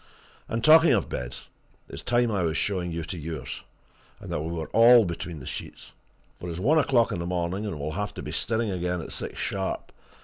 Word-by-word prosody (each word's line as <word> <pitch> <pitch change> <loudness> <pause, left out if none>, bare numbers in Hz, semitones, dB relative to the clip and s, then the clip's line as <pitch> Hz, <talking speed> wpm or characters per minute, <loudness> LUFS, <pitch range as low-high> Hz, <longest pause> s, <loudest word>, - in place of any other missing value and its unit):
And 115 0 -2
talking 160 +4 +7
of - - +1
beds, - - -6 0.4
it's 70 - -8
time 120 +2 +2
I 100 -3 0
was 80 -2 0
showing 90 -4 -1
you 85 0 -3
to 85 +2 -6
yours, 80 -3 -6 0.6
and - - -9
that 75 - -1
we 80 - -4
were 80 -2 -3
all 115 0 +7
between 85 -2 -5
the 65 - -10
sheets, - - -7 0.5
for 90 - -6
it's 85 - -5
one 145 +11 +4
o'clock 125 -6 +3
in - - -2
the 85 - -3
morning, 90 +3 -2
and 85 -7 -5
we'll 75 +2 -3
have 100 +5 -4
to - - -6
be - - -5
stirring 115 -2 0
again 90 -1 -1
at - - -8
six - - -6
sharp. 95 -1 -3
90 Hz, 215 wpm, -26 LUFS, 80-115 Hz, 0.6 s, talking